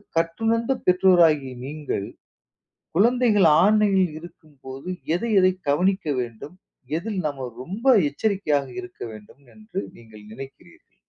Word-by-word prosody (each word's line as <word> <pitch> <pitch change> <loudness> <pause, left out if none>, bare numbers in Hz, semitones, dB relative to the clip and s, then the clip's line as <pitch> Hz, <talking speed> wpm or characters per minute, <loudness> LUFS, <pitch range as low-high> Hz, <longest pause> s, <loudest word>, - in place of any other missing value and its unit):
கற்றுணர்ந்த 225 +9 0
பெற்றோராகிய 170 -7 +4
நீங்கள், 145 -9 -4 0.9
குழந்தைகள் 220 -3 +4 0.2
ஆன்லைனில் 200 -5 +3
இருக்கும்போது 145 -3 -11 0.3
எதை 230 +6 -2
எதை 185 0 +4 0.2
கவனிக்க 185 +4 +1
வேண்டும், 120 +7 -8 0.4
எதில் 205 +1 -4
நம்ம 135 -3 -5 0.2
ரொம்ப 195 - -7 0.2
எச்சரிக்கையாக 150 -4 -1
இருக்க 180 0 -11
வேண்டும் 110 +6 -15
என்று 215 -3 -7 0.2
நீங்க 110 -2 -16 0.2
நினைக்கிறீர்கள்? 135 - -13
175 Hz, 105 wpm, -23 LUFS, 140-205 Hz, 0.9 s, பெற்றோராகிய